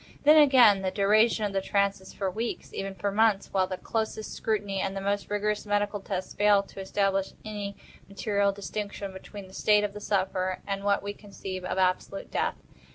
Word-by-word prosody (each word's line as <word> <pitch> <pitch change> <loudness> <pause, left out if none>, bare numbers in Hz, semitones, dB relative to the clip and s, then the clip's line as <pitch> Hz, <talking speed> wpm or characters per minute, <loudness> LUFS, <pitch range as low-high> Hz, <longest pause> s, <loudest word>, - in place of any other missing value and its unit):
Then 300 +2 +7
again 245 -9 +6
the 190 - 0
duration 215 +3 +3
of 200 - -3
the 195 - +1
trance 200 0 +1
is 190 - -12
for 195 -2 -2
weeks—even 195 -2 -4
for 200 +2 -2
months; 210 -1 +2
while 190 -1 +2
the 185 - -4
closest 220 0 -3
scrutiny, 205 -3 -1
and 195 0 -2
the - - -1
most 200 +1 -2
rigorous 210 0 -1
medical 205 0 0
tests, 190 -1 -4
fail 205 -1 +4
to 195 - -12
establish 195 0 0
any 205 -2 -5 0.3
material 200 0 +1
distinction 200 0 -5
between 190 +1 -10
the 190 - -16
state 210 +1 +3
of 205 -1 -2
the 210 - -8
sufferer 185 -2 0
and 195 0 -3
what 200 -1 +2
we 205 0 -4
conceive 195 -3 -7
of 185 - -3
absolute 185 +1 0
death. - - 0
200 Hz, 190 wpm, -28 LUFS, 195-210 Hz, 0.3 s, Then